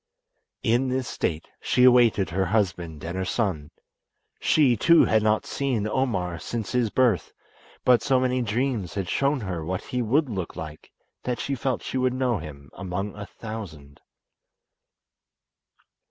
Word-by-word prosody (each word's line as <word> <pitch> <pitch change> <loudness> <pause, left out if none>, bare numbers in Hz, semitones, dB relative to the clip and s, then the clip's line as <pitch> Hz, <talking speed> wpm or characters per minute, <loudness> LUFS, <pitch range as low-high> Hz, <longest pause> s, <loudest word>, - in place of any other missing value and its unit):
In 120 +3 +2
this 130 -1 -1
state 80 -1 -2
she 125 - +2
awaited 120 -8 +5
her 95 +2 +1
husband 85 -6 -1
and 85 +2 -4
her 95 - -1
son. 90 -5 -1 0.7
She, 140 -6 +4
too, 170 +10 +5
had 110 -1 +3
not 110 0 +2
seen 125 -7 -1
Omar 95 -9 -1
since 115 +1 -4
his 125 -3 +1
birth, 115 -8 +1 0.5
but 125 -2 +5
so 130 -1 +2
many 130 0 +1
dreams 115 -4 -1
had 95 -3 -2
shown 140 +4 +1
her 90 -5 -4
what 90 +4 -3
he 125 - -2
would 135 +7 +2
look 95 -7 -4
like 75 -1 -8 0.3
that 125 -1 -2
she 140 - -2
felt 130 -1 -2
she 130 - -2
would 130 -1 +1
know 125 -5 +1
him 70 -3 -10
among 95 +1 -4
a 100 -1 -7
thousand. 85 -11 -9
110 Hz, 155 wpm, -25 LUFS, 90-125 Hz, 0.7 s, awaited